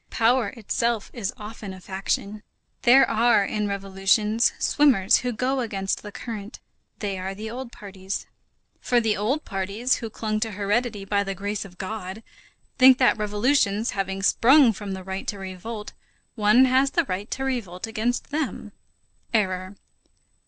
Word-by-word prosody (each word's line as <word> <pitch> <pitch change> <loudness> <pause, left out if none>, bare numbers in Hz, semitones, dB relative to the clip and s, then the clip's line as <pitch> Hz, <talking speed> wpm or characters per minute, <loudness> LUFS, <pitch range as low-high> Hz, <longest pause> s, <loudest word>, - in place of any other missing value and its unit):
Power 235 0 +2
itself 230 0 -1
is 215 -5 -3
often 210 -3 -8
a - - -11
faction. 195 +2 -3 0.4
There 265 +2 +6
are, 230 -2 +3
in 210 0 -2
revolutions, 200 +3 +1
swimmers 260 -11 +4
who 250 - -2
go 255 +4 -1
against 195 -5 -2
the 210 - -9
current; 215 0 -7 0.4
they 200 -3 -3
are 190 +1 -4
the 220 +2 -6
old 250 0 -6
parties. 195 -2 -6 0.5
For 245 - +2
the 220 -2 +1
old 255 +10 -1
parties 200 +6 -1
who 230 - -6
clung 215 0 -2
to 220 -1 -2
heredity 205 +1 -1
by 200 0 +1
the 195 -1 -4
grace 205 +2 -3
of 180 -2 -14
God, 200 +1 -6 0.6
think 260 0 +8
that 250 -4 +3
revolutions, 210 0 +1
having 195 0 -3
sprung 255 +3 +5
from 200 -1 -6
the 190 0 -6
right 190 +1 -5
to 205 - -3
revolt, 195 +3 -7 0.4
one 215 +3 +5
has 260 +2 +3
the 340 +3 +1
right 200 -1 -4
to 270 - -3
revolt 230 -9 -3
against 225 +5 -2
them. 285 -8 -3 0.6
Error. 185 -2 0
210 Hz, 155 wpm, -24 LUFS, 195-240 Hz, 0.6 s, think